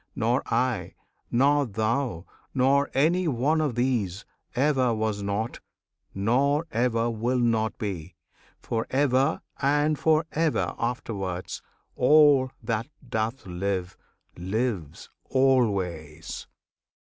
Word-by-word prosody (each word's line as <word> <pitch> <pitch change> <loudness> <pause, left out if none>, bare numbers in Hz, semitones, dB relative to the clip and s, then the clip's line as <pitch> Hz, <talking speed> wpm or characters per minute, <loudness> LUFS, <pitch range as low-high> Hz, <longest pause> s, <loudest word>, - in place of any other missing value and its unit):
Nor 120 0 +1
I, 125 +1 0 0.3
nor 140 +3 +3
thou, 110 -3 -1 0.3
nor 140 +2 +3
any 170 +6 +3
one 150 +4 +1
of 145 -6 -1
these, 115 -7 -1 0.3
Ever 130 -3 +2
was 110 -2 -1
not, 100 +3 -2 0.6
nor 135 +10 +2
ever 115 -1 +1
will 120 +3 -1
not 115 -3 +1
be, 95 -7 -5 0.4
For 115 -1 -3
ever 135 +2 +2 0.2
and 145 +2 +2
for 160 0 +3
ever 160 -1 0
afterwards. 100 -7 -3 0.3
All, 145 -1 +5
that 115 0 -1 0.2
doth 115 +1 -2
live, 95 0 -3 0.4
lives 95 - -3 0.2
always! 95 - 0
120 Hz, 100 wpm, -26 LUFS, 105-135 Hz, 0.6 s, All